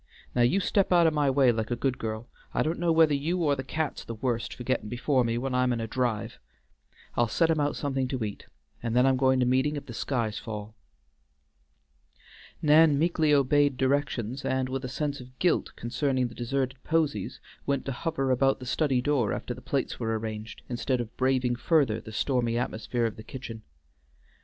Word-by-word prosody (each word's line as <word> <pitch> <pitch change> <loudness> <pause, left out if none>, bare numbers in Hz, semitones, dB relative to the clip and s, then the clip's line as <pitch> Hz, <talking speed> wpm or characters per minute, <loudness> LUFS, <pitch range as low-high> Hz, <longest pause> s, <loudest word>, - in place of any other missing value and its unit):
Now 125 - +2
you 120 +11 +4
step 195 0 +1
out 175 -2 +6
o' 160 - +5
my 150 -2 +2
way 135 -2 +4
like 110 -1 -2
a 120 - 0
good 130 +2 -1
girl. 110 +1 -4 0.3
I - - +3
don't 160 +2 -2
know 170 -1 +2
whether 160 -2 +5
you 155 +6 0
or 145 -2 +3
the 130 - -4
cat's 155 +3 -3
the 115 - -6
worst 120 0 -2
for 125 - -7
gettin' 120 -4 -1
before 125 +2 +1
me 115 0 0
when 130 +2 -2
I'm 125 0 +2
in 120 - -1
a 115 - -2
drive. 120 -2 -2 0.8
I'll 120 - +3
set 165 +8 +2
him 160 - +1
out 145 0 +1
somethin' 135 -2 -1
to 130 -2 -2
eat, 105 -2 -6 0.3
and 115 0 -2
then 125 +1 +5
I'm 135 0 +4
goin' 130 0 +3
to - - +3
meetin' 130 +4 +2
if 145 - -5
the 120 - -8
skies 115 -3 -2
fall." 105 -1 -7 1.9
Nan 150 -1 +6
meekly 160 -1 +2
obeyed 145 -1 +3
directions, 130 -3 0
and 130 -1 0
with 135 +1 -3
a 130 - -4
sense 145 +2 -2
of 125 0 -13
guilt 180 - +1
concerning 130 +1 -1
the - - -12
deserted 130 +2 -2
posies 150 -11 0 0.3
went 140 -1 0
to 135 - -2
hover 135 0 -1
about 135 +2 +2
the 130 - -8
study 130 -1 +1
door 135 -7 +1
after 125 - -4
the 125 - -11
plates 135 +1 -2
were 115 -2 0
arranged, 110 0 -6
instead 125 +1 -1
of 120 -2 -5
braving 130 -1 +1
further 125 -4 +2
the 110 - -10
stormy 120 0 0
atmosphere 120 0 -1
of 110 -2 -3
the 110 - -9
kitchen. 115 -2 -8
130 Hz, 205 wpm, -28 LUFS, 120-145 Hz, 1.9 s, out